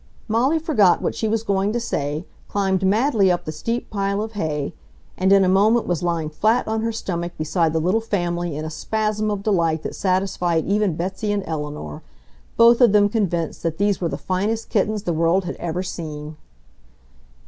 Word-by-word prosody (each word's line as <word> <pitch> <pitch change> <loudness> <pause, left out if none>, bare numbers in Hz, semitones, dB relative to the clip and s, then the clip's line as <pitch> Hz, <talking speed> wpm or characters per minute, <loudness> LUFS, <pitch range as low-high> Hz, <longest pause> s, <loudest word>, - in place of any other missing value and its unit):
Molly 245 +8 +2
forgot 230 - +3
what - - -1
she 220 - -2
was 220 0 0
going 200 -1 0
to 240 - 0
say, 150 -7 -3 0.2
climbed 195 -2 0
madly 210 0 +3
up 175 - -1
the 155 - -3
steep 230 +10 -4
pile 200 -1 -1
of 220 +1 -3
hay, 155 -8 -3 0.4
and 190 +1 +1
in 195 -1 +6
a - - +2
moment 210 +5 +3
was 175 -3 -1
lying 170 -3 -1
flat 220 +10 +1
on 220 0 -1
her 230 +1 -1
stomach 175 -5 -4
beside 160 +1 +1
the 160 - 0
little 185 +8 +1
family 175 -6 -2
in 155 - -4
a 160 - -5
spasm 215 +5 -1
of 205 -1 -3
delight 165 -6 +1
that - - -4
satisfied 185 -3 0
even 200 -3 +1
Betsy 190 +5 -2
and 205 -1 -1
Eleanor, 150 - -5 0.6
both 235 +1 +6
of 235 -4 +6
them 205 -1 +5
convinced 175 -7 -1
that 165 -1 -2
these 205 -1 +1
were 170 - 0
the 140 - -4
finest 205 +7 -2
kittens 210 0 0
the 175 - -1
world 165 +4 +2
had - - -4
ever 175 +2 -3
seen. 155 -4 -6
190 Hz, 190 wpm, -22 LUFS, 165-215 Hz, 0.6 s, in